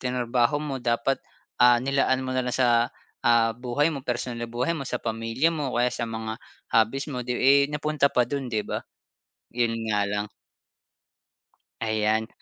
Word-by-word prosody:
trinarbaho 125 Hz, +1 st, +1 dB
mo 140 Hz, -3 st, -4 dB
dapat, 120 Hz, +2 st, 0 dB, 0.4 s
ah, 120 Hz, 0 st, +7 dB
nilalaan 130 Hz, 0 st, +1 dB
mo 130 Hz, -, -3 dB
na 130 Hz, -, +1 dB
lang -, -, -2 dB
sa, 120 Hz, -2 st, +3 dB, 0.3 s
ah, 115 Hz, -1 st, +4 dB
buhay 125 Hz, +6 st, 0 dB
mo 140 Hz, -, -5 dB
personal 120 Hz, -2 st, -3 dB
na 120 Hz, -, -4 dB
buhay 125 Hz, +7 st, 0 dB
mo 150 Hz, -, -4 dB
sa 125 Hz, -, -1 dB
pamilya 115 Hz, +6 st, 0 dB
mo 150 Hz, -5 st, -2 dB
o -, -, -1 dB
kaya 125 Hz, +1 st, +2 dB
sa 115 Hz, -, -3 dB
mga 110 Hz, +1 st, -5 dB, 0.3 s
hobbies 115 Hz, +6 st, +2 dB
mo 125 Hz, -, -3 dB
'di, 125 Hz, 0 st, -2 dB
eh, 140 Hz, +1 st, +6 dB
napunta 150 Hz, -1 st, +1 dB
pa 125 Hz, -, +3 dB
do'n, 135 Hz, 0 st, -3 dB
'di 110 Hz, -2 st, 0 dB
ba? -, -, -3 dB, 0.7 s
Yun 120 Hz, -1 st, +1 dB, 0.2 s
nga 105 Hz, -1 st, +2 dB
lang 105 Hz, 0 st, -2 dB, 1.6 s
Ayan. 110 Hz, 0 st, +1 dB
125 Hz, 175 wpm, -26 LUFS, 115-135 Hz, 1.6 s, ah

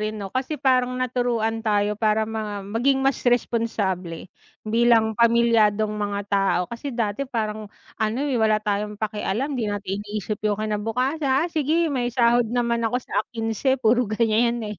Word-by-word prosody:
rin 215 Hz, 0 st, -2 dB
'no, 195 Hz, -, -6 dB
kasi 260 Hz, +6 st, -2 dB
parang 255 Hz, -3 st, +2 dB
naturuan 245 Hz, -3 st, -1 dB
tayo 210 Hz, 0 st, +1 dB
para 215 Hz, 0 st, +2 dB
ma 210 Hz, -2 st, -4 dB
maging 235 Hz, +7 st, +1 dB
mas 270 Hz, 0 st, +2 dB
responsable 205 Hz, -8 st, -1 dB, 0.3 s
bilang 225 Hz, -1 st, +2 dB
pamilyadong 230 Hz, -3 st, +3 dB
mga 205 Hz, -1 st, -2 dB
tao 195 Hz, -2 st, +2 dB
kasi 235 Hz, +3 st, -6 dB
dati 230 Hz, +3 st, -2 dB
parang 215 Hz, -4 st, -3 dB, 0.3 s
ano 220 Hz, +2 st, 0 dB
eh, 250 Hz, -, +1 dB
wala 215 Hz, -1 st, +2 dB
tayong 210 Hz, 0 st, -2 dB
pakialam, 215 Hz, +5 st, -2 dB
'di 225 Hz, -, -1 dB
natin 200 Hz, -1 st, -3 dB
iniisip 210 Hz, 0 st, -4 dB
'yung 210 Hz, -, +2 dB
kinabukasa 225 Hz, +8 st, -1 dB, 0.2 s
"Ah 345 Hz, -, -1 dB
sige 320 Hz, +2 st, +1 dB
may 255 Hz, -3 st, -1 dB
sahod 240 Hz, -1 st, +3 dB
naman 235 Hz, 0 st, 0 dB
ako 245 Hz, +3 st, -1 dB
sa, -, -, -2 dB
ah, -, -, -1 dB
kinse." 225 Hz, +3 st, 0 dB
Puro 235 Hz, +2 st, +3 dB
ganiyan 230 Hz, +2 st, +1 dB
eh, 210 Hz, -, -8 dB
225 Hz, 160 wpm, -23 LUFS, 210-245 Hz, 0.3 s, pamilyadong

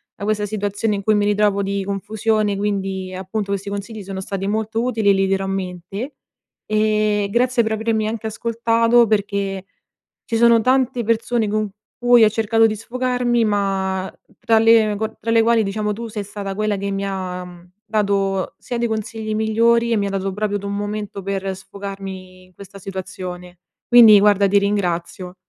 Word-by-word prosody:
da -, -, -9 dB
questa 210 Hz, 0 st, 0 dB
situazione 205 Hz, +1 st, -1 dB
in 200 Hz, -, -5 dB
cui 215 Hz, -, +3 dB
mi 205 Hz, -1 st, +2 dB
ritrovo 205 Hz, -1 st, +2 dB
di 200 Hz, 0 st, -2 dB
confusione 210 Hz, +1 st, -1 dB
quindi 195 Hz, -2 st, -2 dB
appunto 195 Hz, +2 st, -4 dB
questi 200 Hz, 0 st, -3 dB
consigli 205 Hz, +2 st, -6 dB
sono 190 Hz, 0 st, -6 dB
stati 195 Hz, 0 st, -4 dB
molto 220 Hz, +2 st, -1 dB
utili 225 Hz, -4 st, +1 dB
e -, -, +6 dB
li 195 Hz, 0 st, +1 dB
terrò 195 Hz, 0 st, 0 dB
a -, -, -3 dB
mente. 195 Hz, -, -5 dB, 0.5 s
E 215 Hz, -1 st, +1 dB
grazie 245 Hz, +1 st, +2 dB
per 220 Hz, 0 st, -1 dB
avermi 220 Hz, 0 st, 0 dB
anche 220 Hz, 0 st, -4 dB
ascoltato 230 Hz, +1 st, +2 dB
perché 200 Hz, -2 st, -1 dB, 0.6 s
ci 230 Hz, -, -1 dB
sono 235 Hz, 0 st, +5 dB
tante 255 Hz, 0 st, +1 dB
persone 230 Hz, 0 st, 0 dB
con 215 Hz, 0 st, -1 dB, 0.3 s
cui 245 Hz, -1 st, +5 dB
ho -, -, +6 dB
cercato 225 Hz, +1 st, +2 dB
di 215 Hz, -1 st, -1 dB
sfogarmi 245 Hz, +1 st, 0 dB
ma 190 Hz, -2 st, -1 dB, 0.3 s
tra 230 Hz, -2 st, +3 dB
le 220 Hz, -2 st, +4 dB, 0.2 s
tra 230 Hz, -, -3 dB
le 230 Hz, 0 st, +5 dB
quali 230 Hz, 0 st, +3 dB
diciamo 210 Hz, +1 st, -2 dB
tu 230 Hz, +3 st, -6 dB
sei 210 Hz, -1 st, -5 dB
stata 200 Hz, -1 st, -6 dB
quella 215 Hz, 0 st, -1 dB
che 200 Hz, +1 st, -3 dB
mi 195 Hz, 0 st, -2 dB
ha 180 Hz, -2 st, -6 dB, 0.2 s
dato 200 Hz, -3 st, 0 dB
sia 245 Hz, -, -5 dB
dei 235 Hz, -, +1 dB
consigli 220 Hz, 0 st, -4 dB
migliori 230 Hz, +2 st, +2 dB
e -, -, +3 dB
mi 200 Hz, -1 st, 0 dB
ha -, -, -3 dB
dato 195 Hz, 0 st, -2 dB
proprio 205 Hz, +1 st, -2 dB
d -, -, -11 dB
un 200 Hz, 0 st, -3 dB
momento 205 Hz, -1 st, -4 dB
per 195 Hz, 0 st, -3 dB
sfogarmi 190 Hz, -1 st, -9 dB
in 185 Hz, -, -26 dB
questa 200 Hz, +1 st, -12 dB
situazione. 180 Hz, -2 st, -7 dB, 0.3 s
Quindi 225 Hz, -4 st, +8 dB
guarda 205 Hz, -1 st, +4 dB
di 200 Hz, +1 st, +4 dB
ringrazio. 180 Hz, -3 st, -2 dB
205 Hz, 175 wpm, -20 LUFS, 195-225 Hz, 0.6 s, Quindi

